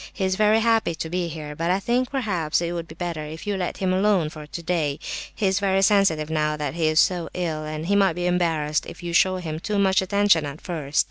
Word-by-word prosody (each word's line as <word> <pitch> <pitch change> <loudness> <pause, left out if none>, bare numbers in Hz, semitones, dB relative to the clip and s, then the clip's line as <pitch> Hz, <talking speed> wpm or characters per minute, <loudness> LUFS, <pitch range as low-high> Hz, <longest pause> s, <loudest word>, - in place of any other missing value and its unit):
He 195 - -4
is 190 - +1
very 215 +2 +3
happy 225 -7 +2
to 160 0 -5
be 180 -1 -1
here; 155 -2 -7
but 165 +3 -2
I 185 +2 +2
think 240 +5 0
perhaps 180 - 0
it 170 0 -2
would 170 -1 -4
be 160 - -11
better 170 -3 -4
if 155 +2 -8
you 205 -1 -1
let 185 -2 -3
him 185 -1 0
alone 190 -4 +2
for 155 -2 -10
today,—he 165 +4 -3
is 190 +1 +2
very 195 -1 +2
sensitive 185 -7 +3
now 150 -1 0
that 145 -3 -3
he 165 -1 0
is 155 0 +3
so 175 -3 +2
ill—and 155 -3 -3
he 200 +3 +1
might 195 -3 +4
be 175 +1 -3
embarrassed 165 -4 0
if - - -10
you 170 -1 -4
show 185 +1 +4
him 160 -4 -4
too 210 +4 -2
much 190 -1 +3
attention 195 -3 +3
at 140 +2 -8
first. 150 -5 -3
175 Hz, 240 wpm, -24 LUFS, 155-195 Hz, -, might